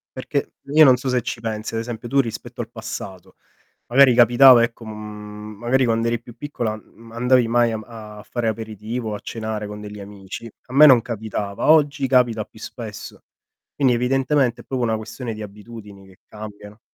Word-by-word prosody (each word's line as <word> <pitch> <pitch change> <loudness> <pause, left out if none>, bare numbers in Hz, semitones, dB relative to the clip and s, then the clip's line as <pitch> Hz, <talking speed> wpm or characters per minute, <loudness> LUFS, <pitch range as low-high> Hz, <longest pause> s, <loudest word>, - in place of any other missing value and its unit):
Perché, - - -3 0.2
io 155 - +8
non 130 -2 +6
so 130 - -6
se 125 -1 +1
ci 120 0 -5
pensi, 110 -1 -4
ad 115 - -1
esempio, 115 0 -6
tu 140 +3 +2
rispetto 120 0 -3
al 115 - -7
passato, 100 -5 -8 0.5
magari 130 0 +6
capitava 120 +1 +7
ecco, 115 0 -3
uhm, 105 -1 -9
magari 125 +3 +2
quando 115 0 +1
eri 115 0 0
più 120 -1 -14
piccola, 120 -7 -3
uhm, 115 +1 -14
andavi 125 0 +3
mai 120 0 +2
a 110 -1 -8
fare 120 -2 -2
aperitivo 110 +1 -4
o - - -3
a - - -7
cenare 110 -2 -5
con 105 0 -8
degli 105 0 -9
amici. 100 +2 -9 0.2
A 125 - -11
me 150 +3 +8
non 125 -5 +7
capitava, 110 0 -3
oggi 145 -3 +4
capita 120 -4 +2
più 110 - -19
spesso. 110 -1 -9 0.5
Quindi 135 -3 +3
evidentemente 130 +1 +1
è - - -16
proprio 130 -2 -2
una 110 -1 +1
questione 110 +2 -6
di 110 - -8
abitudini 105 -1 -11
che 95 -1 -19
cambiano. 105 0 -10
115 Hz, 185 wpm, -21 LUFS, 105-125 Hz, 0.5 s, io